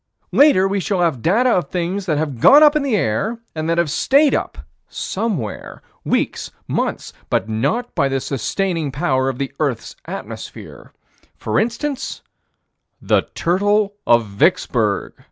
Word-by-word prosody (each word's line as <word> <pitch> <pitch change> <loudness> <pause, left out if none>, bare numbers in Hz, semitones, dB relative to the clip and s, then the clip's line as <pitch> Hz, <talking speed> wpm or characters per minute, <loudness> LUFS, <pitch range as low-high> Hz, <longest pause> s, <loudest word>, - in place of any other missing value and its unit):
Later, 275 -10 +5
we 195 +1 -1
shall 190 -1 -1
have 160 -9 0
data 235 - +3
of 180 -6 0
things 185 +2 -3
that 155 -3 +1
have 145 -5 -3
gone 290 - +8
up 300 0 +6
in 305 - +2
the 275 -5 0
air 195 - -1 0.2
and 155 0 -3
that 165 - +1
have 170 -4 +1
stayed 280 - +3
up - - -2 0.3
somewhere 190 - -4 0.2
weeks - - -1 0.2
months - - -2 0.2
but - - 0
not 135 - -1
by 140 -5 +1
the 135 0 0
sustaining 160 - -2
power 130 -1 0
of 130 - -4
this 135 0 -3
earth's 140 -7 -2
atmosphere. - - -9 0.5
For 110 - 0
instance, 250 +5 -3 0.8
the - - +1
turtle 205 +4 +1
of 115 -1 +4
Vicksburg. 100 -1 0
175 Hz, 150 wpm, -19 LUFS, 135-215 Hz, 0.8 s, gone